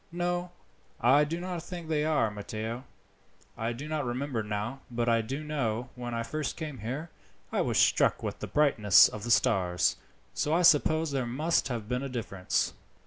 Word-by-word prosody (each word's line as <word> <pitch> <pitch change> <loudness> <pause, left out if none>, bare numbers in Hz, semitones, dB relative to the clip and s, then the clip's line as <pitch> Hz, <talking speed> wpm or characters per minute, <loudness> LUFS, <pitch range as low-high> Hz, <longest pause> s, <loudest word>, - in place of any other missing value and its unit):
"No, 175 +1 -1 0.5
I 135 +5 +5
do 165 +3 -3
not 180 -1 -4
think 175 -1 -8
they 155 -2 +1
are, 150 -8 +2
Matteo. 110 +4 -5 0.7
I 115 +1 -2
do 130 +6 -6
not 155 -1 -1
remember 125 0 -2
now, 105 +5 -4
but 120 -1 -2
I 115 -1 +3
do 135 +7 -5
know, 125 -6 -2
when 120 -1 -5
I 115 - -1
first 155 +4 -3
came 150 -6 -6
here, 135 +10 -5 0.4
I - - +1
was - - 0
struck - - +3
with - - -4
the - - -5
brightness 115 -10 +6
of 105 - -7
the 120 - -4
stars, 95 -8 +2 0.4
so 150 +2 0
I 180 - +2
suppose 160 0 +4
there 135 -3 -1
must 155 +8 +1
have 115 -5 -4
been 125 +2 -1
a 135 - -4
difference." 100 -7 -1
130 Hz, 185 wpm, -29 LUFS, 115-155 Hz, 0.7 s, brightness